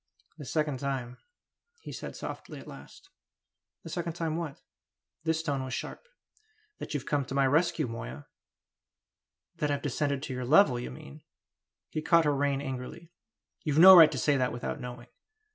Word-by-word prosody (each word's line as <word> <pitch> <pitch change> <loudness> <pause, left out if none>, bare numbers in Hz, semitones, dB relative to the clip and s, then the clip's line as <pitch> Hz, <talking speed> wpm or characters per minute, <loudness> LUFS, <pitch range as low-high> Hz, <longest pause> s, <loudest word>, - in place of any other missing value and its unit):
"The 145 - -7
second 150 -1 -1
time," 130 -3 -4 0.6
he - - -9
said - - -7
softly - - -7
at - - -12
last. - - -13 0.7
"The - - -8
second 170 -2 -3
time 165 -2 -2
what?" 165 -4 -5 0.7
This 160 0 0
tone 140 -4 -2
was 130 - -4
sharp. - - -7 0.7
"That - - -6
you've 140 -2 -3
come 145 -1 0
to 135 - -6
my 140 -1 +3
rescue, 155 +2 +2
Moya." 115 +5 -7 1.3
"That 150 - -1
I've 140 -1 -1
descended 140 0 -1
to 135 - -4
your 125 0 -4
level, 135 -1 +5
you 120 - -5
mean!" 65 +2 -11 0.7
He 155 - -3
caught 165 +1 +4
her 145 -1 +2
rein 140 0 0
angrily. 135 +5 -7 0.5
"You've 150 -3 -1
no 190 +3 +11
right 160 -3 +9
to - - -4
say 145 -2 +2
that 125 -1 0
without 120 - -5
knowing!" 125 0 -8
145 Hz, 170 wpm, -29 LUFS, 130-160 Hz, 1.3 s, no